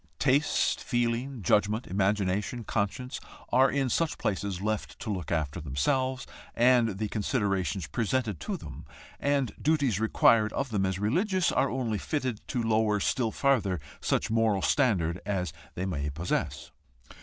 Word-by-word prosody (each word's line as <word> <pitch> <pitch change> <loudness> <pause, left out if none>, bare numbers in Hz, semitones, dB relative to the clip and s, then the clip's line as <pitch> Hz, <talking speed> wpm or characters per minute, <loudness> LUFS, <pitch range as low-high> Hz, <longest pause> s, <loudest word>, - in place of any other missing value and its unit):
Taste, 145 +2 +2
feeling, 120 0 -1
judgment, 105 +6 +2
imagination, 100 +4 0
conscience, 110 +5 -2 0.3
are 130 +2 +5
in 140 -1 0
such 160 +6 0
places 100 -2 -2
left 105 +1 -3
to 110 - -4
look 90 -5 -5
after 80 0 -1
themselves, 130 - 0 0.3
and 120 -4 +4
the 110 +1 -1
considerations 100 - -1
presented 110 - -1
to - - -3
them, - - -9 0.4
and 140 -4 +1
duties 140 - +2
required 110 0 +4
of 135 -1 -2
them 95 -3 +1
as 95 -1 -2
religious, 180 - +1
are 140 - +2
only 120 -5 -1
fitted 130 -7 -2
to 125 -3 -1
lower 110 -2 +2
still 115 +3 +1
farther 110 - +1 0.2
such 110 - 0
moral 110 -4 +2
standard 95 - +2
as 90 -5 -2 0.2
they 90 - -2
may 75 -6 -2
possess. 85 +5 -3
110 Hz, 145 wpm, -28 LUFS, 95-130 Hz, 0.4 s, are